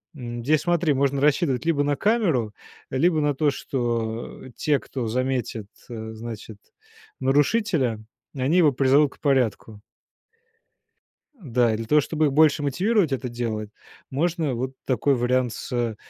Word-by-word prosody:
м, 120 -3 -6
здесь, 150 +4 +2
смотри, 170 -2 +1
можно 140 0 +1
рассчитывать 145 -2 +2
либо 155 -4 +2
на 145 0 +1
камеру, 165 - +1 0.4
либо 160 +4 +2
на 150 -1 +1
то, 145 0 +2
что 120 -4 -3
те, 145 -2 +1
кто 125 -4 -5
заметит, 125 -3 -2 0.2
э, 110 -1 -6
значит, 110 -1 -8 0.6
нарушителя, 140 - +1 0.3
они 135 +6 +1
его 160 -5 +5
призовут 135 +2 +3
к - - -30
порядку. 120 -6 0 1.5
Да, 125 - +1
и - - -1
для 115 - -5
того, 150 +6 +4
чтобы 155 +2 0
их 145 - +1
больше 155 +1 +4
мотивировать 180 - +1
это 130 -1 -2
делать, 110 -3 -4 0.4
можно 160 0 0
вот 130 +2 -3
такой 135 +1 +2
вариант 125 0 +1
с 120 -1 -3
135 Hz, 140 wpm, -24 LUFS, 120-150 Hz, 1.5 s, его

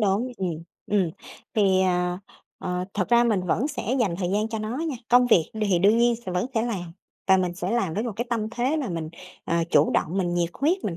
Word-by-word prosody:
đúng, 215 +5 +1
ừm, 185 -4 -2 0.4
ừm, 195 -5 +1 0.4
thì, 195 -3 +3
à, 180 -1 +1 0.4
ờ, 180 0 -3
thật 185 -3 -1
ra 240 0 +5
mình 215 -6 +1
vẫn 245 - +1
sẽ 265 -4 -2
dành 190 -8 +1
thời 180 -2 -1
gian 210 +2 0
cho 225 -1 -3
nó 215 +3 -3
nha. 315 -5 -2
Công 245 0 +5
việc 175 -9 +3
đ 220 - -3
hì 190 -4 +2
đương 205 +6 +4
nhiên 240 0 +4
sẽ 185 - -3
vẫn 180 +6 0
sẽ 225 - +2
làm 190 -8 -4 0.3
và 190 0 +6
mình 180 -2 -1
sẽ 180 +1 -3
làm 220 -8 0
với 215 - -1
một 235 -2 -3
cái 240 - -1
tâm 220 -2 -1
thế 255 +5 0
là 290 -5 -2
mình, 165 -3 -4 0.4
ờ, 170 - 0
chủ 150 -1 +4
động, 180 +5 0
mình 175 -2 0
nhiệt 175 -1 0
huyết, 335 - 0
mình 175 -5 -2
200 Hz, 245 wpm, -25 LUFS, 180-235 Hz, 0.4 s, và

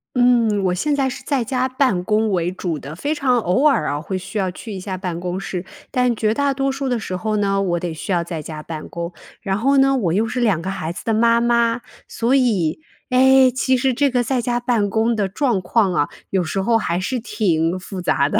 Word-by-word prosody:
嗯， 235 -5 +3
我 180 - +2
现 290 +10 0
在 270 -2 +1
是 255 - -8
在 275 -4 0
家 255 +2 0
办 255 -8 +1
公 215 +2 +1
为 175 -2 0
主 180 -3 -3
的， 145 +1 -8
非 290 - -2
常 260 -4 +2
偶 190 - +1
尔 265 - +2
啊， 145 +1 -1
会 180 +5 -5
需 185 +4 -5
要 190 -3 0
去 215 +5 -9
一 195 - -5
下 185 0 -5
办 180 -2 -4
公 180 +1 -3
室。 185 -2 -5 0.2
但 250 -1 +1
绝 215 0 0
大 285 +1 +1
多 270 0 0
数 275 0 -3
的 245 -2 0
时 185 -4 -4
候 215 +2 -2
呢， 195 -1 +1
我 175 -2 0
得 175 -1 -3
需 160 - -5
要 175 -2 +2
在 170 -1 -5
家 155 0 -7
办 155 0 -7
公。 170 0 -5 0.3
然 195 -2 -1
后 275 +6 +2
呢， 270 0 +4
我 180 -9 0
又 215 +5 +1
是 250 +2 -3
2 210 -9 +2
个 185 - -4
孩 165 -4 -3
子 185 - -8
的 225 - 0
妈 230 +1 +4
妈， 235 0 +2 0.3
所 235 +3 0
以， 215 - +1 0.3
诶， 260 0 +6
其 260 +1 +1
实 260 +1 +2
这 275 +2 +1
个 245 -1 +2
在 255 +2 0
家 240 0 0
办 240 -4 +1
公 220 +3 +1
的 205 -3 0
状 235 +1 0
况 190 +1 +1
啊， 145 - +1 0.2
有 190 -2 +1
时 175 +4 -2
候 230 +3 +3
还 175 -5 -1
是 245 +7 -2
挺 175 -6 0
复 185 +1 -7
杂 140 -5 +1
的。 - - +1
215 Hz, 260 characters per minute, -20 LUFS, 180-250 Hz, 0.3 s, 诶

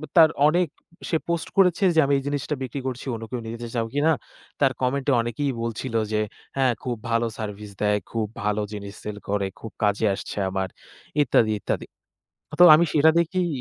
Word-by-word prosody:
তার 160 -2 +8 0.2
অনেক 175 +3 +3 0.4
সে 165 - +2
post 170 -1 -1
করেছে 185 0 +4
যে - - +5
"আমি 140 - +1
এই - - -8
জিনিসটা 145 +1 -2
বিক্রি 130 +2 -4
করছি 130 -1 -5
অন্য 115 - -7
কেউ 125 - -3
নিতে 115 +1 -5
যেতে - - -4
চাও 115 -1 0
কিনা?" 145 +3 +3 0.5
তার 135 -2 +4
comment-এ 135 +2 +1
অনেকেই 120 +5 -2
বলছিল 115 +2 -4 0.2
যে 110 0 +1 0.4
"হ্যাঁ, 130 -2 +3
খুব 125 -2 -2 0.2
ভালো 115 0 +2
service 105 -1 -6
দেয়, 105 0 +3
খুব 110 -2 -1 0.2
ভালো 105 0 0
জিনিস 100 -1 -7
sell 105 -1 -5
করে, 100 -1 0
খুব 110 - -8
কাজে 105 +1 +2
আসছে 95 - -6
আমার" 95 0 -1 0.5
ইত্যাদি, 115 -5 +3
ইত্যাদি। - - -2 0.7
তো - - +10
আমি 170 +3 +4
সেটা 155 +2 +6
দেখেই 175 +2 0
120 Hz, 185 wpm, -24 LUFS, 105-145 Hz, 0.7 s, তো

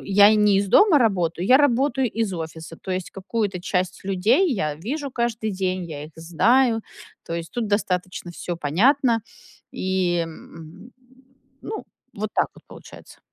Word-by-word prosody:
я 200 +1 +6
и 215 - +4
не 210 -2 +4
из 200 0 +1
дома 365 - +5
работаю, 180 -6 0
я 260 - +7
работаю 270 -2 +2
из 225 -3 -2
офиса. 165 -1 -7
То 190 - -6
есть 185 -1 -3
какую-то 195 -1 -3
часть 180 0 -2
людей 210 - +2
я 155 -6 -1
вижу 275 - -4
каждый 235 -3 -2
день, 185 -2 -2
я 150 -3 -7
их 155 - -13
знаю, 225 +9 +2 0.5
то 165 - -4
есть 165 -1 -6
тут 240 -3 -2
достаточно 185 -3 -2
всё 175 0 -5
понятно 230 - +2 0.5
и, 185 -2 0
м, 165 +5 -10 0.7
ну, 435 - -6 0.3
вот 215 +1 -4
так - - +2
вот - - -17
получается. - - -14
195 Hz, 160 wpm, -23 LUFS, 175-230 Hz, 0.7 s, я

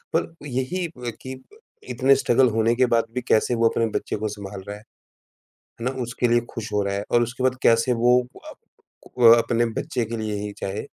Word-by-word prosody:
पर - - -1
यही 130 +8 -2
अ, 125 -7 -7
कि 130 0 -7
ब 415 - -20 0.3
इतने 135 +1 +3
स्ट्रगल 130 -1 +3
होने 115 +1 +2
के 130 +1 +3
बाद 115 0 +3
भी 125 - -2
कैसे 115 +3 +2
वो 115 0 +3
अपने 115 - 0
बच्चे - - -3
को 110 +1 -3
सँभाल 100 -1 -8
रहा 100 - -5
है, - - -16 1.0
है - - -4
ना? 130 - 0
उसके 125 +1 -1
लिए 120 0 +3
खुश 110 -2 -7
हो 105 - +2
रहा 100 0 -2
है 100 - -3
और 120 - +4
उसके 120 +2 -5
बाद 130 0 +2
कैसे 115 +2 +4
वो 125 +1 +5 0.3
अ, - - -10 0.6
वह 120 -1 +8
अपने 120 0 +1
बच्चे 120 -3 -2
के 115 +1 -5
लिए 110 -1 -3
ही 105 0 -5
चाहे, 100 +1 -4
120 Hz, 220 wpm, -23 LUFS, 110-125 Hz, 1.0 s, वह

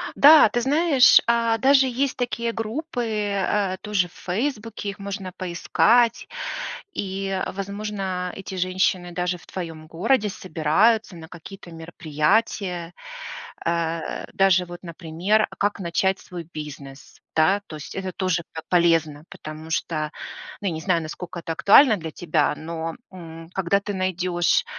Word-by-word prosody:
Да, 300 +2 +9
ты 240 - -1
знаешь, 285 0 +6
а, 230 -1 +2
даже 270 +3 +5
есть 260 +2 -1
такие 235 -1 -1
группы, 245 +5 -3 0.3
а, 195 -1 0
тоже 205 -4 0
в 175 - -22
"Фейсбуке", 220 +1 -3
их 200 - -7
можно 195 -1 -5
поискать. 220 +7 +2 0.7
И, 195 0 -3
возможно, 195 -2 -4
эти 195 0 -7
женщины 185 -1 0
даже 180 +1 -1
в 175 - -18
твоем 165 -4 -7
городе 210 +7 +1
собираются 190 +5 +1
на 160 -1 -10
какие-то 175 +2 -11
мероприятия. 170 +3 -1 0.7
А, 165 -1 -2
даже 190 -2 +4
вот, 175 0 -10
например 175 +5 0
"А - - -12
как 205 +1 0
начать 190 +2 0
свой 175 -2 -8
бизнес?" 145 -2 -9 0.2
Да, 190 +6 +3
то 155 - -8
есть 150 - -9
это 190 -1 -3
тоже 185 -2 0
по 160 - -5
полезно, 165 -4 +2
потому 155 +1 -9
что, 155 -1 -1 0.5
ну, 200 - -2
я 175 - 0
не 160 - -5
знаю, 170 -2 +1
насколько 170 +2 -7
это 165 0 -5
актуально 215 - +6
для 165 -3 -6
тебя, 155 -3 0
но, 165 +1 -5 0.2
м, 165 -3 -10
когда 190 +1 +2
ты 205 0 -4
найдешь 185 -2 +1
185 Hz, 145 wpm, -24 LUFS, 165-210 Hz, 0.7 s, Да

